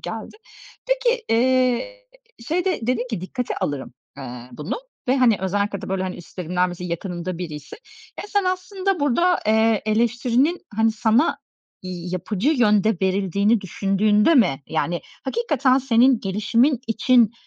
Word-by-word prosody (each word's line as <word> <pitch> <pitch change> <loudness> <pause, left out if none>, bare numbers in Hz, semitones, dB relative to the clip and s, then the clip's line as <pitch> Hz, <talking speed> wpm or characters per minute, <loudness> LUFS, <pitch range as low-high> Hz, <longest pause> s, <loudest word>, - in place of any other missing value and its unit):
geldi. - - -7 0.5
Peki, - - +1
eee, 255 - +1 0.4
şeyde 360 +2 0
dedin 250 0 0
ki, 215 -7 -3
"Dikkate 250 +6 -4
alırım, 140 -4 -4 0.2
aaa, 125 -2 -8
bunu," 150 - -4 0.3
ve 260 - +3
hani, 245 -5 +4
özellikle 200 +1 -1
de - - -6
böyle, 190 0 -1
hani, 185 -1 -4
üstlerimden, 180 +1 -2
mesela, 180 0 -6
yakınımda 175 0 -4
biriyse. 150 -5 -7 0.4
Ya, - - -7
sen 405 -2 +1
aslında 370 0 -1
burada, 345 +6 +2
eee, 220 -1 +3
eleştirinin, 240 +8 +1
hani, 225 0 +3
sana 225 +7 +2 0.4
yapıcı 185 - -3
yönde 215 -6 +3
verildiğini 200 +3 +1
düşündüğünde 205 - +2
mi, 165 - +3
yani, 170 +2 -1 0.2
hakikaten 275 - +1
senin 255 -1 +3
gelişimin 225 +7 +1
için, 230 0 +3
220 Hz, 130 wpm, -22 LUFS, 185-265 Hz, 0.5 s, hani